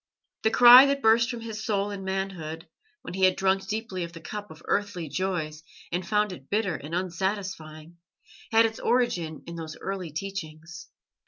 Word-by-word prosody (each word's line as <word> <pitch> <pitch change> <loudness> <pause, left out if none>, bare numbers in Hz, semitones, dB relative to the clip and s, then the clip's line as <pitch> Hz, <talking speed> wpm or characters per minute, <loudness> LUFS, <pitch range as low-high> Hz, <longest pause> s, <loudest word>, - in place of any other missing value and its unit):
The 220 - +3
cry 245 +4 +9
that 275 0 -1
burst 230 +2 +5
from 240 -2 -5
his 220 -1 -6
soul 205 -2 -1
in 200 -1 -6
manhood, 185 -4 -4 0.4
when - - -7
he 190 0 +3
had 185 - +3
drunk 190 0 +1
deeply 210 -3 -3
of 170 0 -7
the 165 - -9
cup 205 +4 -7
of 160 +1 -13
earthly 200 -5 -1
joys 160 -4 -3 0.3
and 175 +1 -1
found 210 +2 +1
it 140 -7 -11
bitter 205 -2 0
and 150 +4 -6
unsatisfying, 175 -3 -4 0.5
had 225 0 +6
its 225 0 -3
origin 175 - 0
in 170 - -8
those 160 -1 -7
early 190 -3 -5
teachings. 170 0 -7
190 Hz, 175 wpm, -26 LUFS, 165-210 Hz, 0.5 s, cry